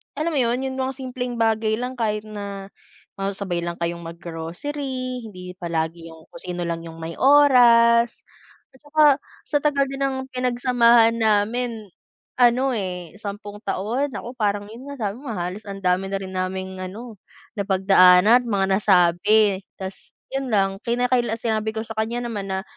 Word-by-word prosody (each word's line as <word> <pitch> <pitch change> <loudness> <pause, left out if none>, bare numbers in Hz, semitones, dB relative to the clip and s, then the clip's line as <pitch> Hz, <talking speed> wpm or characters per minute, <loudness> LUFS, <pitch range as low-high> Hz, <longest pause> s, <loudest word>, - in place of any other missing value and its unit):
alam 310 +4 -1
mo 305 - -1
yun 240 +1 +1
yung 260 - -6
mga 260 0 -1
simpleng 250 -1 -4
bagay 220 -1 +1
lang, 250 +1 -4
kahit 215 -2 -1
na 200 -2 -7 0.5
magsabay 195 -2 -2
lang 170 - -2
kayong 170 0 -2
mag-grocery, 245 - -5
hindi 180 -3 -10
palagi 165 -1 -3
yung 160 -1 -17
kung 170 - -12
sino 180 -1 -4
lang 170 -1 -3
yung 165 0 -10
may 165 +1 -6
oras 240 -4 +5 0.5
at 265 - -21
tsaka 305 +1 +3 0.5
sa 295 - +2
tagal 285 -1 +2
din 270 - -5
ng 270 -1 0
pinagsamahan 240 -2 +3
namin 220 +1 0 0.5
ano 250 +2 +4
eh 180 -7 -4
10 205 0 -7
taon. 235 +9 -1
Naku 240 - -6
parang 205 -1 0
yun 245 +5 -11
nga 260 -8 -3
sabi 205 - -8
mo 265 -5 -6
halos 180 +4 -5
ang 195 0 -7
dami 185 +1 +1
na 195 - -3
rin 190 -1 -7
naming 190 0 -4
ano 210 +5 -8 0.4
napagdaana't 195 +3 +5
mga 200 -4 +1
nasabi 195 +2 +4 0.2
'tas 190 0 -9 0.2
yun 270 0 -2
lang. 195 -1 +2
Kinakaila 240 -1 +1
sinabi 220 -1 -2
ko 220 - -2
sa 225 -1 -9
kanya 235 +2 -2
naman 205 -3 -4
na 190 0 -3
215 Hz, 160 wpm, -23 LUFS, 190-245 Hz, 0.5 s, oras